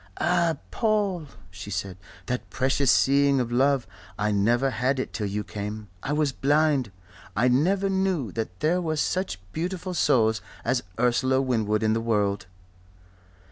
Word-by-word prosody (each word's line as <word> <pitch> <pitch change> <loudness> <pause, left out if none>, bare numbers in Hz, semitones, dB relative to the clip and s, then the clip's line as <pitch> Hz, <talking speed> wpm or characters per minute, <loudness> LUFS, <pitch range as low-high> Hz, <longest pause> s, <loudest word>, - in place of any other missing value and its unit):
"Ah, 175 -2 +2
Paul," 205 -7 0 0.2
she 95 +3 -9
said. 95 -2 -3 0.3
"That 125 0 -3
'precious 135 +1 +1
seeing' 140 0 +4
of 120 -2 -2
love 135 +1 +2 0.3
I 105 +1 0
never 120 +6 +2
had 130 +4 0
it - - -4
till 105 - -2
you 105 +1 -3
came. 105 0 -6
I 135 - -3
was 150 -1 +1
blind. 145 -4 +2 0.4
I 115 +5 +3
never 180 +11 +2
knew 190 - 0
that 100 -4 -5
there 175 +4 +2
were 160 -2 -1
such 180 - -1
beautiful 180 +2 -3
souls 110 -9 +2 0.2
as 120 +1 +1 0.2
Ursula 130 +2 +2
Winwood 110 -5 0
in 110 0 +3
the 115 - 0
world." 105 -4 0
130 Hz, 150 wpm, -26 LUFS, 110-155 Hz, 0.4 s, seeing